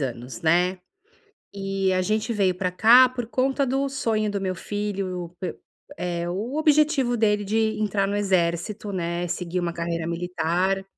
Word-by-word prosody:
anos, 125 -3 -5
né, 180 +3 +2 0.8
e 195 -1 -1
a 185 - +1
gente 215 +4 -1
veio 190 -3 +2
para 180 -1 -1
cá 240 +7 +7
por 245 -2 -5
conta 265 +3 +1
do 270 +2 0
sonho 220 -6 -1
do 200 - -3
meu 185 -1 -2
filho, 190 -4 -4
pe 180 -3 -4 0.4
eh, 175 -1 -2
o 220 +11 -3
objetivo 300 -5 +3
dele 210 -2 +2
de 220 +1 0
entrar 205 -2 0
no 200 - -1
Exército, 195 +1 0
né, 175 -1 -2
seguir 180 +1 -3
uma 170 -1 -2
carreira 170 -1 -3
militar. 175 +2 -1
195 Hz, 160 wpm, -24 LUFS, 175-220 Hz, 0.8 s, cá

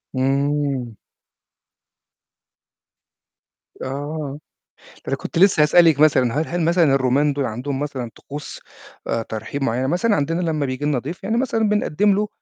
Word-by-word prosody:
إمم. 135 -2 0 2.9
آه. 145 +1 -5 0.5
ده - - -20
أنا - - 0
كنت - - -6
لسّه 185 -5 +5
هاسألِك 160 -1 +5
مثلًا 130 -6 +4
هل - - -4
هل 175 +1 -2
مثلًا 170 +2 +3
الرومان 135 +3 +2
دُول 140 -1 -1
عندهم 130 +5 -4
مثلًا 135 -5 -4
طقوس 145 +1 -8 0.5
آآ، 115 - 0
ترحيب 110 +6 -5
معيّنة، 125 +2 0
مثلًا 205 +7 +1
عندنا 165 +5 -1
لمّا 155 -4 -1
بييجي 130 +2 -3
لنا 145 -4 +1
ضيف 165 +9 -7
يعني 220 +4 -1
مثلًا 225 -4 +1
بنقدّم 210 -1 +2
له 210 +1 0
145 Hz, 140 wpm, -21 LUFS, 130-170 Hz, 2.9 s, لسّه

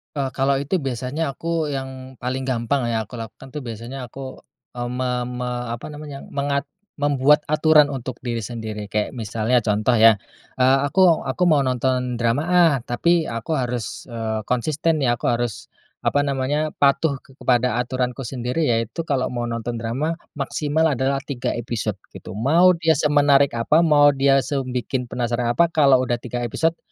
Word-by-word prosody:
E 135 -2 -1
kalau 135 +1 +2
itu 145 +7 0
biasanya 135 +1 -3
aku, 165 - -9 0.3
yang 130 -1 -6
paling 130 +2 -2
gampang 130 +1 0
ya 115 -1 0
aku 110 +3 -9
lakukan 115 +4 -9
tuh 150 +2 -6
biasanya 120 +3 -6
aku, 130 +2 -9 0.4
mmm, 120 0 -3
me 125 0 -1 0.2
me 125 0 -4 0.3
apa 120 - -7
namanya, 145 -2 -8
mengat 140 0 -2 0.3
membuat 145 +1 +4
aturan 155 -1 +5
untuk 130 -3 -6
diri 120 -2 -3
sendiri. 110 -2 -5
Kayak 105 +1 -1
misalnya 110 +2 0
contoh 110 +3 +2
ya, 110 0 +8 0.5
eee, 130 +1 +5
aku 175 +2 +4
aku 135 +7 -1
mau 145 -3 +3
nonton 125 0 0
drama 120 +4 0
ah, 175 -3 +5
tapi, 170 +7 +2
aku 115 +7 -3
harus, 120 -7 -3
eee, 110 -3 -4
konsisten 150 +6 0
ya 120 -3 +2
aku - - -7
harus, 120 -3 -3 0.4
apa 145 - +3
namanya, 145 +2 -1
patuh 140 +1 +2
kepada 125 -2 0
aturanku 125 +1 -2
sendiri 125 +4 -2
yaitu 115 +6 -1
kalau 130 -3 0
mau 120 -1 -2
nonton 115 0 -4
drama, 130 +8 -1 0.2
maksimal 150 +2 0
adalah 135 +2 0
3 130 -4 -3
episode, 110 -3 -3 0.2
gitu. 100 - -9
Mau 170 +9 +4
dia 160 -1 +3
semenarik 140 -3 +3
apa, 150 +8 +3
mau 145 -3 +5
dia 135 0 +3
se 140 -2 -1
bikin 125 0 -3
penasaran 120 0 -1
apa, 170 -1 +3
kalau 140 -4 +5
udah 120 -1 -2
3 120 0 -4
episode, 165 +8 0
130 Hz, 165 wpm, -22 LUFS, 120-145 Hz, 0.5 s, ya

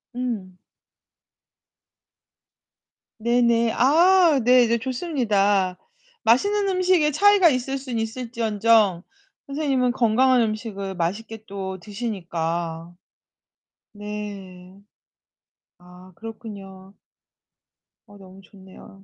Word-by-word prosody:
음. 215 -8 -5 2.6
네네. 235 0 +2
아 335 +2 +4
네 245 0 +5
네 235 - +1
좋습니다. 210 - 0 0.5
맛있는 405 - +2
음식에 365 -5 +2
차이가 400 +1 +5
있을 265 0 -2
순 255 -4 -5
있을지언정 225 -4 +1 0.4
선생님은 275 -3 0
건강한 250 +1 +3
음식을 215 -3 -4
맛있게 210 +6 -4
또 190 -1 -6
드시니까. 170 -5 -5 1.0
네. 200 -3 -9 1.0
아, 180 +1 -16
그렇군요. 200 -4 -11 1.1
어 205 - -16
너무 190 0 -15
좋네요. 195 0 -16
225 Hz, 180 characters per minute, -23 LUFS, 195-255 Hz, 2.6 s, 네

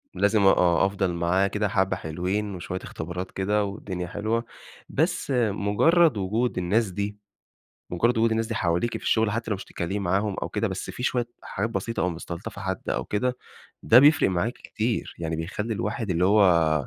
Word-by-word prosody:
لازم 105 +1 +3
آه 90 -1 +4
أفضل 95 -2 0
معاه 85 +3 +2
كده 105 +1 -1
حبّة 95 -1 +1
حلوين 95 +5 -3
وشويّة 90 +1 -5
اختبارات 90 +3 -6
كده 105 +2 0
والدنيا 95 -3 -5
حلوة، 110 +5 -2 0.4
بس 165 0 0 0.2
مجرّد 120 - +3
وجود 110 +6 -1
الناس 100 +5 +1
دي 100 +2 -4 0.7
مجرّد 115 +7 +1
وجود 115 +1 +3
الناس 110 0 0
دي 115 - -4
حواليكِ 90 +5 0
في - - -14
الشغل، 110 -1 +2
حتّى 115 +1 -3
لو 105 - +2
مش - - -9
تتكلّمي 90 +4 -4
معاهم 100 +2 0
أو - - -2
كده، - - -1
بس - - -5
في - - -7
شويّة 125 -2 0 0.2
حاجات 105 +4 -3
بسيطة 115 0 -3
أو 90 - +2
مستلطفة 85 +3 -7
حد 95 -1 -4
أو - - -1
كده، 125 +5 -1 0.5
ده 115 - +7
بيفرق 145 +4 +6
معاكِ 95 +6 0
كتير 115 +1 -3
يعني، 80 -1 -3
بيخلّي 105 +7 -3
الواحد 105 0 -3
اللي 90 0 +2
هو، 85 -7 +4
100 Hz, 180 wpm, -25 LUFS, 90-110 Hz, 0.7 s, ده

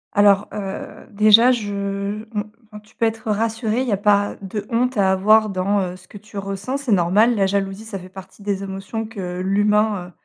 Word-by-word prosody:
Alors, 205 0 +4
heu, 195 -1 -7
déjà, 215 +4 +6
je, 210 -5 -2
mmh, 200 +2 -3 0.4
enfin, 210 -1 -11
tu 210 - -25
peux 230 - +1
être 225 -1 -2
rassuré, 225 +2 -1
il 260 - -2
y - - -1
a 200 - +2
pas 205 0 +2
de 200 +2 -5
honte 250 +2 0
à 195 -3 +3
avoir 215 +3 +4
dans, 195 +2 0
heu, 180 -1 -4
ce 185 0 -17
que 205 - -12
tu 210 0 -12
ressens, 195 +7 -3
c'est 275 -5 -4
normal. 200 +6 +4
La 195 -2 +2
jalousie, 195 +2 -2
ça 200 -3 -6
fait 185 0 -11
partie 190 +2 -13
des 200 -1 -2
émotions 195 +3 -5
que 180 -4 -6
l'humain, 205 0 +1
heu, - - -17
205 Hz, 210 wpm, -21 LUFS, 195-220 Hz, 0.4 s, déjà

